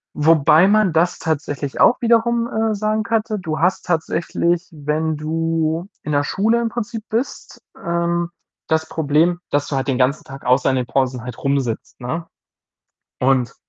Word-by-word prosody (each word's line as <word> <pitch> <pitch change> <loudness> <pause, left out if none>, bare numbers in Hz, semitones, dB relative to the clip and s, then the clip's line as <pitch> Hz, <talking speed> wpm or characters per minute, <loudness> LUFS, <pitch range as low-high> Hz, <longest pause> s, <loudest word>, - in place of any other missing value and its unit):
wobei 160 +3 +5
man 210 -4 +3
das 170 +2 +1
tatsächlich 145 -3 -3
auch 245 - +5
wiederum, 235 0 +3
äh, 220 -1 0
sagen 215 +1 0
könnte. 215 0 -1
Du 160 -4 -3
hast 180 +3 +1
tatsächlich, 170 +1 0
wenn 155 +1 -2
du 165 +2 -1
in 150 - -4
der 145 0 +2
Schule 220 +8 +1
im 235 - 0
Prinzip 225 0 -5
bist, 235 +5 -4 0.2
ähm, 170 0 -1 0.4
das 160 0 0
Problem, 160 +3 +1
dass 145 0 0
du 140 - -2
halt 135 +1 -2
den 135 - +1
ganzen 130 +3 +1
Tag 135 0 -11
außer 125 +1 +3
in 130 - +1
den 125 - -1
Pausen 130 -1 0
halt 125 -1 -8
rumsitzt, 135 -5 -2
ne, 165 +7 -4 0.9
und 130 -2 +2
160 Hz, 160 wpm, -20 LUFS, 145-200 Hz, 0.9 s, wobei